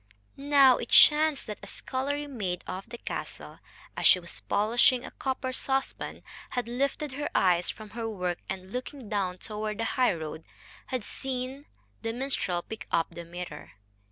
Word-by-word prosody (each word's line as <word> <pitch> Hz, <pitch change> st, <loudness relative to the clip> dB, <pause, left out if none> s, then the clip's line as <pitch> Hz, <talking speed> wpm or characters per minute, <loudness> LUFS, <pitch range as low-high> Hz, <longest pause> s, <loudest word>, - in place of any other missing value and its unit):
Now 275 Hz, -2 st, +6 dB
it 235 Hz, -, -5 dB
chanced 305 Hz, -1 st, +7 dB
that 210 Hz, -, -6 dB
a -, -, -9 dB
scullery 285 Hz, +3 st, -2 dB
maid 200 Hz, -11 st, -3 dB
of 190 Hz, +4 st, -6 dB
the 240 Hz, -, -7 dB
castle, -, -, -6 dB, 0.4 s
as -, -, +3 dB
she 185 Hz, -, +8 dB
was 170 Hz, -1 st, -7 dB
polishing 240 Hz, +4 st, +3 dB
a -, -, -8 dB
copper 260 Hz, -1 st, -2 dB
saucepan, 270 Hz, +1 st, -2 dB, 0.3 s
had 245 Hz, -2 st, -2 dB
lifted 275 Hz, +4 st, -1 dB
her 290 Hz, +3 st, -3 dB
eyes 180 Hz, -2 st, +4 dB
from 215 Hz, -1 st, -7 dB
her 230 Hz, -1 st, -3 dB
work, 180 Hz, -4 st, -2 dB
and, 190 Hz, 0 st, -5 dB
looking 255 Hz, -2 st, -5 dB
down 190 Hz, -3 st, 0 dB
toward 210 Hz, +1 st, -4 dB
the 230 Hz, -, -1 dB
highroad, 165 Hz, -, 0 dB, 0.4 s
had 255 Hz, -4 st, -2 dB
seen 265 Hz, +4 st, -4 dB, 0.4 s
the 225 Hz, -, -2 dB
minstrel 235 Hz, -9 st, -1 dB
pick 220 Hz, -, -8 dB
up 165 Hz, 0 st, +2 dB
the 170 Hz, 0 st, -8 dB
mirror. 175 Hz, -3 st, -8 dB
230 Hz, 160 wpm, -29 LUFS, 185-265 Hz, 0.4 s, she